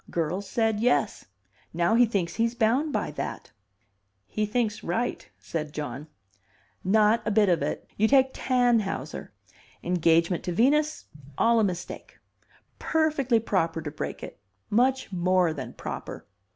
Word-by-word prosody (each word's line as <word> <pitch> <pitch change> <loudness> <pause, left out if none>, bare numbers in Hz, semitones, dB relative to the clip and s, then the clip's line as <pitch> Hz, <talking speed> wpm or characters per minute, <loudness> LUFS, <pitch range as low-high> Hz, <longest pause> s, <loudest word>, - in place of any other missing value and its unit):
Girl's 175 +4 -2
said 225 0 +1
yes. 230 -2 +1 0.5
Now 170 +4 +2
he 240 +1 +5
thinks 190 -6 -2
he's 230 +1 +1
bound 250 +7 +1
by - - -2
that." 145 - -6 0.7
"He 210 - -2
thinks 220 -1 -1
right," 230 +8 -2
said 150 -2 -5
John. 145 -1 -5 0.8
"Not 215 +3 +3
a - - -1
bit 210 -2 +3
of 175 -4 +2
it. 145 - -3
You 220 - +3
take 265 +1 +4
Tannhauser. 245 -5 0 0.5
Engagement 170 0 +2
to 180 - -2
Venus 295 - +2 0.3
all 230 0 +4
a - - +3
mistake. 180 -4 -5 0.6
Perfectly 295 -7 +1
proper 165 -7 0
to 155 -2 -5
break 150 - -6
it. - - -9 0.3
Much 255 +2 +2
more 180 -2 +2
than 145 - -7
proper. - - -7
210 Hz, 140 wpm, -26 LUFS, 170-240 Hz, 0.8 s, he